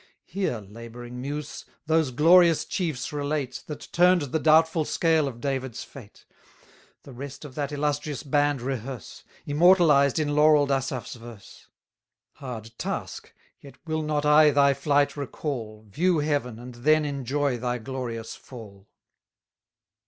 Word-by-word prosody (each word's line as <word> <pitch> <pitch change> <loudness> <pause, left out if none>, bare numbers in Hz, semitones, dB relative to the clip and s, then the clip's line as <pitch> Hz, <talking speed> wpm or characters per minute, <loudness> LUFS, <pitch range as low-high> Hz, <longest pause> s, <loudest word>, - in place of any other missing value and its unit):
Here, 185 -9 -2
labouring 120 +3 -9
muse! 145 +3 -5 0.2
those 160 -2 +2
glorious 165 +5 +5
chiefs 155 -7 -3
relate, 145 -3 -3
That 150 -1 -8
turn'd 180 -1 +4
the 160 - 0
doubtful 160 +1 +4
scale 160 -1 +1
of 120 -3 -7
David's 130 -2 -3
fate; 115 -7 -14 0.8
The 135 - -12
rest 140 +4 -8
of 140 - -10
that 145 +1 -3
illustrious 145 -1 -2
band 145 -2 +1
rehearse, 130 -2 -6 0.2
Immortalized 150 -3 +4
in 155 -2 0
laurell'd 150 -1 +4
Asaph's 135 -2 -2
verse: 115 -4 -13 0.7
Hard 115 -5 -8
task! - - -5 0.3
yet 140 - -14
will 155 -1 -2
not 150 -1 -1
I 150 +1 +6
thy 140 -1 +4
flight 145 +1 +1
recall, 125 -6 -5
View 170 - +1
heaven, 145 -6 -1
and 125 +1 -10
then 155 +6 +2
enjoy 140 -1 -1
thy 125 0 -2
glorious 120 -2 -6
fall. 105 -5 -13
140 Hz, 130 wpm, -25 LUFS, 125-150 Hz, 0.8 s, I